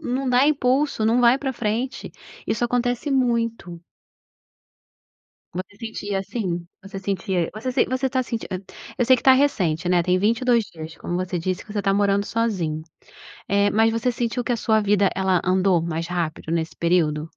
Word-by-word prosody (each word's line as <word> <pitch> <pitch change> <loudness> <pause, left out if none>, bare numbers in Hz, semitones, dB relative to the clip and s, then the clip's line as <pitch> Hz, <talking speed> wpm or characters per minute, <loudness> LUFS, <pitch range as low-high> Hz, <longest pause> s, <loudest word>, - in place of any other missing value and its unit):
não 265 -1 -1
dá 250 +3 +4
impulso, 270 -4 +1
não 235 +3 +3
vai 240 +2 +5
pra 270 -1 -2
frente, 240 +4 -3 0.4
isso 230 - 0
acontece 245 +3 0
muito. 230 -9 -1 1.7
Você 185 +3 -7
sentia 205 -3 -4
assim, 185 -4 -3 0.2
você 195 0 -9
sentia, 185 -3 -2
você 250 +4 0
você 260 +1 -1
tá 260 -1 0
senti 230 -2 -5 0.5
eu 245 - +2
sei 260 +1 +6
que - - -7
está 265 - +7
recente, 185 - +1
né, 180 -1 +3
tem 180 +1 +2
22 235 +3 +2
dias 160 0 -10
como 175 - -4
você 180 0 -2
disse 185 +2 -3
que 210 - -12
você 205 - -2
tá 195 -1 +1
morando 200 0 +2
sozinho, 185 -9 -1 0.7
eh, 200 0 +2
mas 225 +1 +3
você 230 +2 0
sentiu 240 +1 -2
que 245 - -1
a - - +1
sua 220 -1 +2
vida 205 -1 +2
ela 190 -2 +2
andou 185 -2 +2
mais 165 0 -3
rápido 165 -2 -3
nesse 165 -1 -1
período? 160 -3 +1
205 Hz, 175 wpm, -23 LUFS, 180-245 Hz, 1.7 s, está